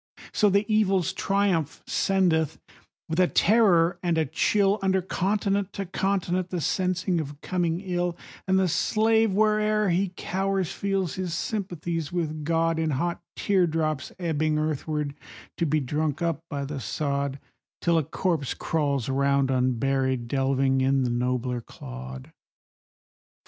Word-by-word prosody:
So 210 - +4
the 200 +2 +2
Evil's 195 -4 +2
triumph 195 -6 0
sendeth, 175 -6 +1 0.5
with 160 +2 -2
a 180 - +5
terror 175 -5 +4
and 175 -2 0
a 160 - +2
chill, 200 +7 +2
Under 190 -1 +2
continent 195 +1 -1
to 195 - -4
continent, 185 -1 -1
the 180 - -2
sense 185 +4 -1
of 155 -6 -1
coming 175 -1 -1
ill, 175 -2 -2 0.3
And 190 0 +3
the 190 -1 +3
slave, 220 +5 +2
where'er 215 0 +2
he 185 +2 +1
cowers, 195 -1 -1
feels 195 -3 -1
his 180 -3 -3
sympathies 175 - -3
with 155 -3 -2
God 165 +1 +1
In 160 -1 0
hot 170 +5 -1
tear 190 -3 +2
drops 155 -3 -1
ebbing 155 -3 0
earthward, 150 -1 -2 0.4
to 170 - +1
be 155 +1 +2
drunk 150 +2 -1
up 165 -1 -1
by 140 -2 -3
the 140 0 -5
sod, 140 +4 -2 0.4
Till 170 -1 +2
a - - 0
corpse 160 -1 -1
crawls 140 -6 -1
round 140 0 +2
unburied, 130 0 +1
delving 135 0 +1
in 135 0 +2
the 125 - 0
nobler 125 0 -1
clod. 65 - -9
165 Hz, 140 wpm, -26 LUFS, 140-190 Hz, 0.5 s, a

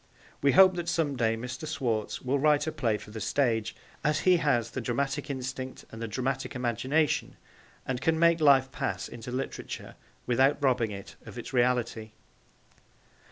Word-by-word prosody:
We 140 -1 +4
hope 190 0 +8
that 170 -1 -2
some 160 -5 0
day 115 -2 +1
Mr. 125 +7 -6
Schwartz 115 -7 -2
will 135 +2 +1
write 150 0 +3
a 160 - -2
play 120 -9 0
for 105 - -12
the 110 0 -6
stage, 115 -3 0 0.3
as 150 -1 +1
he 185 -1 +5
has 120 -8 +1
the 130 - -4
dramatic 135 +5 -2
instinct 130 -1 -5
and 115 - -9
the 115 - -2
dramatic 130 +5 -3
imagination, 130 +5 0 0.5
and 130 -1 -3
can 160 +3 +2
make 170 0 +4
life 135 -3 +5
pass 95 -1 -3
into 120 +1 -8
literature 130 +2 -5 0.3
without 130 +4 +3
robbing 125 -5 +2
it 100 -1 -9
of - - -9
its - - -7
reality. 120 -3 0
130 Hz, 165 wpm, -28 LUFS, 115-145 Hz, 0.5 s, hope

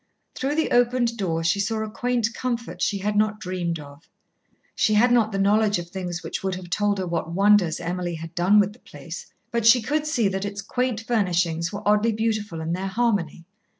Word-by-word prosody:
Through 275 +3 -2
the 320 - 0
opened 245 -1 +2
door 165 -6 -1
she 165 +5 +1
saw 220 +2 -1
a 215 - -6
quaint 240 -1 -1
comfort 240 -2 -4
she 205 - +1
had 205 +2 -2
not 215 0 +1
dreamed 180 -4 -3
of. 145 +2 -13 0.6
She 215 - +2
had 240 +4 +4
not 230 -3 +3
the 195 - -2
knowledge 205 +1 +3
of 175 0 -7
things 175 -2 -5
which - - -4
would 190 -1 -2
have 180 -1 -9
told 205 +1 +1
her 190 - -2
what 170 -1 -3
wonders 195 -3 +4
Emily 175 0 -3
had 165 +1 -8
done 185 +4 +4
with 205 0 +2
the 240 - -20
place, - - -9 0.2
but 235 -1 0
she 230 +3 +7
could 300 +6 -1
see 240 -8 +1
that 195 0 -2
its 200 0 -5
quaint 245 +1 -1
furnishings 175 -7 0
were 205 +1 -6
oddly 210 +2 +3
beautiful 215 -6 -2
in 160 +1 -2
their 190 +2 -2
harmony. 195 -6 -1
205 Hz, 210 wpm, -24 LUFS, 175-225 Hz, 0.6 s, she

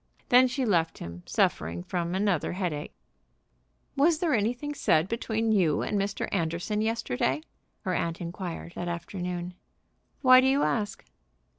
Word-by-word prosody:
Then 250 +1 +7
she 260 +1 -1
left 170 -7 +1
him 85 +1 -8
suffering 85 +3 0
from 175 - -2
another 190 -6 +1
headache. 175 -6 -3 1.0
"Was 310 +4 +4
there 330 -2 +1
anything 245 +6 0
said 165 - +2
between 225 0 -1
you 175 -8 +2
and - - -2
Mr. 200 0 -2
Anderson 170 +3 -1
yesterday?" 155 - 0 0.4
her 185 - -2
aunt 170 -1 -1
inquired, 170 0 -6
that 175 - -5
afternoon. 175 0 -4 0.7
"Why 255 0 +8
do 260 - +3
you 275 +2 +3
ask?" 205 -4 -1
190 Hz, 140 wpm, -28 LUFS, 170-230 Hz, 1.0 s, Why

